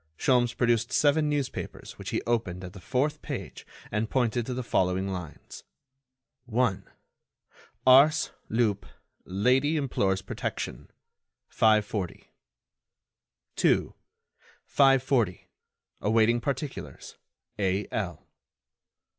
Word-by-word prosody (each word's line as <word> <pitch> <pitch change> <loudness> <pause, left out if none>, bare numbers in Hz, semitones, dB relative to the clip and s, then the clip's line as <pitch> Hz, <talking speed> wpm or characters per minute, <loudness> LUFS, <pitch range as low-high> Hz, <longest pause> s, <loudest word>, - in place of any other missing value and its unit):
Sholmes 120 -2 +2
produced 120 -1 +1
seven 150 +1 +3
newspapers 145 -3 -4
which - - -6
he - - -2
opened 105 -6 -1
at 90 0 -8
the 95 - -11
fourth 145 +7 -1
page - - -7 0.2
and 110 +1 -1
pointed 120 -2 0
to 130 - -2
the 130 - -3
following 95 -3 0
lines: 90 -5 -8 0.8
1. 120 -4 0 1.0
Ars. 140 +4 +6 0.2
Lup. 110 -3 0 0.4
Lady 130 - +2
implores 95 -9 0
protection. - - -5 0.6
540. 105 -4 +1 1.2
2. - - +2 0.7
540. 130 -8 +2 0.5
Awaiting 115 +2 +3
particulars. 140 +2 -5 0.4
A.L. 95 -2 -2
115 Hz, 90 wpm, -27 LUFS, 100-130 Hz, 1.2 s, Ars